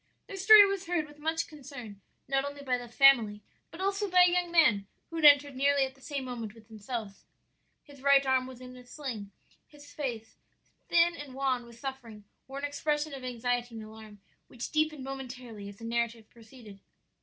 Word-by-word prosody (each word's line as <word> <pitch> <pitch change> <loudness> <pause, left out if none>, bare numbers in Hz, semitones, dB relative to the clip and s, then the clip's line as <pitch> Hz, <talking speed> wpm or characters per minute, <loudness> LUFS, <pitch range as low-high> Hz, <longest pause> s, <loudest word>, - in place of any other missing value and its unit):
"Their 395 - -8
story 410 +2 +9
was 390 -2 -3
heard 340 -3 0
with 295 0 -17
much 320 +2 -1
concern, 260 -9 -11 0.3
not 270 0 +1
only 285 0 -7
by 255 -2 0
the 245 - -9
family, 230 -5 +4 0.3
but 330 - -12
also 395 +1 -1
by 360 0 +6
a 355 - +3
young 355 0 0
man 260 - +3 0.2
who 330 - -5
had 320 - +1
entered 285 -1 +7
nearly 280 +1 +3
at 265 - -8
the 270 - -24
same 280 -1 -4
moment 230 -4 -6
with 225 0 -18
themselves. 215 -1 -7 0.6
"His 280 -2 -16
right 280 0 +5
arm 260 -1 +2
was 255 -1 -11
in 255 0 -10
a 250 - -12
sling; 245 -6 -7 0.4
his 290 -1 -16
face, 235 -7 -5 0.5
thin 340 0 +4
and 285 -4 -9
wan 260 -3 -1
with 235 -1 -14
suffering, 240 -5 -8 0.2
wore 270 +1 -8
an 280 - -3
expression 295 +1 -2
of 270 -2 -8
anxiety 245 -1 -2
and 220 - -7
alarm 215 -1 -13 0.3
which 240 -1 -7
deepened 310 -3 0
momentarily 250 -6 -8
as 200 - -12
the 230 - -10
narrative 230 -1 -2
proceeded. 225 -3 -15
265 Hz, 195 wpm, -29 LUFS, 235-295 Hz, 0.6 s, story